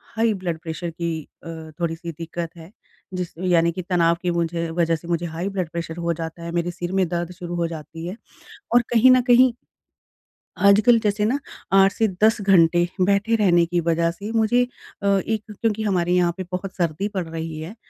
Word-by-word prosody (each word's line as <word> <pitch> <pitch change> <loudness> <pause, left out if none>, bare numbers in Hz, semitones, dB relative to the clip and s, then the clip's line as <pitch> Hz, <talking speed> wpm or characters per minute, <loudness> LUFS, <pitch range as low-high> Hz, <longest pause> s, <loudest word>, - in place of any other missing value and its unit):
High 225 0 +2
blood 180 -4 -4
pressure 165 +1 -5
की 165 -1 -3 0.2
अ, - - -10 0.3
थोड़ी-सी 170 0 -3
दिक्कत 165 +1 -6
है। 165 +2 -12 0.4
जिस 180 -2 -4
यानी 170 -2 +2
कि 185 +2 -5
तनाव 170 -2 +2
की 180 -2 0
मुझे 170 0 -1
वज़ह 165 0 +1
से 165 +1 -10
मुझे 170 0 -1
हाई 175 +4 -3
ब्लड 180 -4 -1
प्रेशर 165 0 -5
हो 170 0 +1
जाता 165 +1 -7
है। 170 - -5
मेरे 170 +1 -1
सिर 175 0 -5
में 185 - +2
दर्द 175 +1 -3
शुरू 175 -1 -6
हो 170 -1 0
जाती 165 +1 -8
है 185 - -5 0.6
और 245 - +6
कहीं 240 +2 +6
न 255 0 +6
कहीं 250 +1 +6 1.2
आजकल 215 +4 +6
जैसे 210 -1 0
ना 255 +6 +1 0.3
8 195 0 +6
से 220 +2 +1 0.2
10 220 +1 +5
घंटे 175 -3 +4 0.2
बैठे 200 +3 +2
रहने 175 -6 +4
की 175 +1 -1
वज़ह 165 0 +1
से 200 +5 -7
मुझे 230 +2 +3 0.4
अ 200 0 +3
एक 220 -1 -1 0.2
क्योंकि 220 -2 0
हमारे 180 -4 +1
यहाँ 175 -1 +3
पे 185 - -3
बहुत 185 +1 -4
सर्दी 170 +2 -1
पड़ 185 -4 -2
रही 160 -1 -5
है, 165 +7 -7
175 Hz, 200 wpm, -22 LUFS, 170-200 Hz, 1.2 s, और